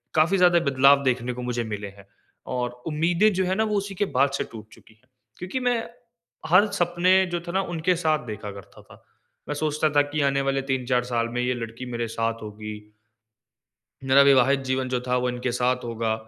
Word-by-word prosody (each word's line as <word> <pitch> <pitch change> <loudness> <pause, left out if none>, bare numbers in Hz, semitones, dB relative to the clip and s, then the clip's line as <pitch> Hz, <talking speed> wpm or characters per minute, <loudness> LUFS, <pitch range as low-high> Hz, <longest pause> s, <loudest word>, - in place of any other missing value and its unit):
काफ़ी 165 +5 +3
ज्यादा 175 -1 +5
बदलाव 140 +1 +5
देखने 125 -1 0
को 125 - -7
मुझे 120 -1 -2
मिले 105 -2 -5
हैं। 100 0 -16 0.5
और 125 0 -1 0.2
उम्मीदें 170 +7 +2
जो 190 0 0
है 185 +1 0
ना 220 - +1
वो - - +1
उसी 200 0 -4
के 205 - 0
बाद 140 +2 +4
से - - -1
टूट 110 -1 -10
चुकी 110 - -19
है। 130 - -33 0.3
क्योंकि 185 +9 -4
मैं 245 -1 +2 0.7
हर 185 +5 +6
सपने 175 +1 +1 0.2
जो 175 - 0
थे - - -3
ना 190 +2 +1
उनके 170 +2 +1
साथ 155 -5 0
देखा 105 -1 -6
करता 100 -2 -13
था। - - -18 0.5
मैं 145 - -2
सोचता 155 +1 0
था - - +7
कि 155 -1 -1
आने 140 0 0
वाले 135 0 +1
3-4 125 -1 0
साल 115 -1 -1
में 125 - -1
ये 125 +1 0
लड़की 115 +1 -7
मेरे 120 -1 -2
साथ 115 0 -3
होगी। 105 0 -7 1.4
मेरा 140 +1 +7
विवाहित 135 0 +4
जीवन 130 0 -1
जो 125 -1 0
था 125 - +1
वो 125 0 0
इनके 125 0 -3
साथ 125 +1 0
होगा 115 -1 -2
130 Hz, 205 wpm, -24 LUFS, 120-165 Hz, 1.4 s, था